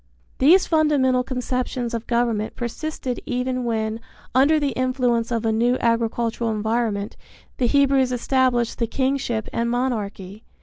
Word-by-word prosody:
These 340 Hz, +8 st, +6 dB
fundamental 290 Hz, -6 st, +2 dB
conceptions 250 Hz, -1 st, -3 dB
of 230 Hz, -1 st, -4 dB
government 235 Hz, -3 st, 0 dB
persisted 250 Hz, +1 st, -4 dB
even 250 Hz, 0 st, -2 dB
when, 220 Hz, -1 st, -1 dB, 0.3 s
under 285 Hz, +4 st, +4 dB
the 285 Hz, -2 st, 0 dB
influence 250 Hz, -2 st, 0 dB
of 230 Hz, -1 st, -1 dB
a 225 Hz, -, +2 dB
new 240 Hz, +3 st, +2 dB
agricultural 230 Hz, 0 st, 0 dB
environment, 220 Hz, -1 st, -1 dB, 0.4 s
the 250 Hz, -, +2 dB
Hebrews 275 Hz, -1 st, +3 dB
established 250 Hz, -1 st, +1 dB
the 230 Hz, -, 0 dB
kingship 260 Hz, -3 st, -1 dB
and 235 Hz, 0 st, 0 dB
monarchy. 215 Hz, -5 st, -3 dB
245 Hz, 130 wpm, -22 LUFS, 230-260 Hz, 0.4 s, These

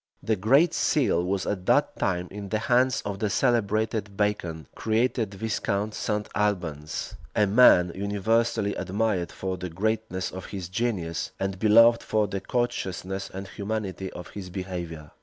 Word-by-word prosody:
The 110 Hz, -, +1 dB
great 135 Hz, -, +4 dB
seal 125 Hz, -, +2 dB
was 95 Hz, +1 st, -1 dB
at 95 Hz, -3 st, -3 dB
that -, -, +3 dB
time 90 Hz, -1 st, 0 dB
in 100 Hz, 0 st, -7 dB
the 110 Hz, -, +1 dB
hands 125 Hz, +3 st, +2 dB
of 100 Hz, -1 st, -4 dB
the 105 Hz, -, 0 dB
celebrated 110 Hz, -2 st, 0 dB
Bacon, 90 Hz, -7 st, -1 dB
created 110 Hz, -2 st, 0 dB
Viscount 105 Hz, 0 st, -1 dB
St. 105 Hz, 0 st, -2 dB
Albans; 90 Hz, -8 st, -2 dB, 0.2 s
a 105 Hz, -, +4 dB
man 100 Hz, -5 st, +6 dB
universally 105 Hz, +2 st, 0 dB
admired 95 Hz, -1 st, -1 dB
for 95 Hz, -1 st, -4 dB
the 90 Hz, -, -5 dB
greatness 105 Hz, +1 st, -2 dB
of 95 Hz, 0 st, -7 dB
his 95 Hz, -4 st, -6 dB
genius, 95 Hz, -6 st, -2 dB
and 95 Hz, -1 st, -2 dB
beloved 115 Hz, +2 st, +6 dB
for 110 Hz, -1 st, +1 dB
the 100 Hz, -1 st, -4 dB
courteousness 95 Hz, -5 st, -2 dB
and 95 Hz, +1 st, -6 dB
humanity 100 Hz, -2 st, -4 dB
of 90 Hz, -, -8 dB
his 95 Hz, -3 st, -8 dB
behavior. 85 Hz, -4 st, -6 dB
100 Hz, 150 wpm, -26 LUFS, 95-110 Hz, 0.2 s, man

